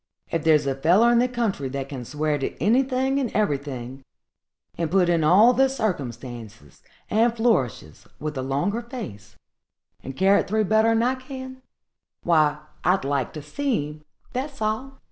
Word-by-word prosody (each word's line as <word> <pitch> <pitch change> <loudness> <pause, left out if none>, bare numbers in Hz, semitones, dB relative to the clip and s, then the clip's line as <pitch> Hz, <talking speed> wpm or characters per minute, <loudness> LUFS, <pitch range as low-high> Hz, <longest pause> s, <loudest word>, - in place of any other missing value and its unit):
if 165 - -1
thar's 155 -3 +4
a 135 - 0
feller 180 - +4
in 240 - +4
the 250 - +3
country 225 - -2
that 135 0 -4
can 135 -3 -6
swear 150 +3 -1
to 135 - -4
anything 260 - +2
and 255 -5 -2
everything, 135 - -2 0.7
and 165 -2 -2
put 180 0 +3
in 170 -2 +2
all 205 +10 +6
the 265 +2 +3
circumstances 120 - -5 0.3
and 230 +2 +3
flourishes 135 - -1
with 150 0 -4
a 130 - -2
longer 140 - -1
face, 110 - -9 0.7
and 135 - -8
carry't 195 +2 +3
through 215 +2 +1
better'n 225 +2 +3
I 250 +2 +2
can, 260 0 -9 0.6
why, 155 -3 +2 0.2
I'd 180 -4 +2
like 140 -3 -1
to 150 - -7
see 250 - -1
him, 150 0 -13 0.3
that's 275 +2 -4
all! 220 +6 -2
180 Hz, 160 wpm, -24 LUFS, -, 0.7 s, all